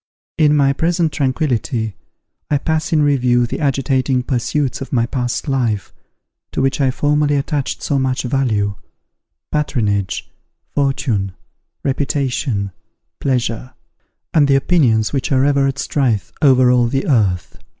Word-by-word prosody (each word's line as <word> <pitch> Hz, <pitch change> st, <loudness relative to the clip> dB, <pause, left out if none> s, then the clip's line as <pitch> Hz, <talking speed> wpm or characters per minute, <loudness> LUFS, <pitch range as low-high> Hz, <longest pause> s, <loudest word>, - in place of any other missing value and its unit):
In 150 Hz, -1 st, +5 dB
my 140 Hz, -1 st, +3 dB
present 165 Hz, +2 st, +1 dB
tranquillity, 130 Hz, -, -1 dB, 0.5 s
I 145 Hz, -, +3 dB
pass 160 Hz, +2 st, -1 dB
in 155 Hz, -2 st, +3 dB
review 125 Hz, -4 st, +3 dB
the 120 Hz, -, -4 dB
agitating 135 Hz, -2 st, +1 dB
pursuits 130 Hz, +1 st, -1 dB
of 135 Hz, -, -6 dB
my 115 Hz, -3 st, +2 dB
past 125 Hz, +3 st, -3 dB
life, 120 Hz, -8 st, -1 dB, 0.6 s
to -, -, -2 dB
which 135 Hz, +1 st, +1 dB
I 135 Hz, -, +3 dB
formerly 145 Hz, +2 st, +1 dB
attached 140 Hz, 0 st, -2 dB
so 140 Hz, -, 0 dB
much 130 Hz, -1 st, 0 dB
value, 120 Hz, -6 st, 0 dB, 0.8 s
patronage, 105 Hz, -10 st, -1 dB, 0.5 s
fortune, 130 Hz, -9 st, 0 dB, 0.5 s
reputation, 130 Hz, -6 st, -1 dB, 0.5 s
pleasure, 125 Hz, -2 st, -2 dB, 0.6 s
and 150 Hz, -3 st, +4 dB
the 140 Hz, -, +4 dB
opinions 135 Hz, -8 st, +2 dB
which 135 Hz, 0 st, -1 dB
are 130 Hz, 0 st, +3 dB
ever 140 Hz, -1 st, +3 dB
at 135 Hz, 0 st, -2 dB
strife 115 Hz, -, -1 dB
over 130 Hz, -4 st, +5 dB
all 120 Hz, -1 st, +3 dB
the 135 Hz, +3 st, -1 dB
earth. 100 Hz, -, 0 dB
135 Hz, 130 wpm, -18 LUFS, 120-145 Hz, 0.8 s, In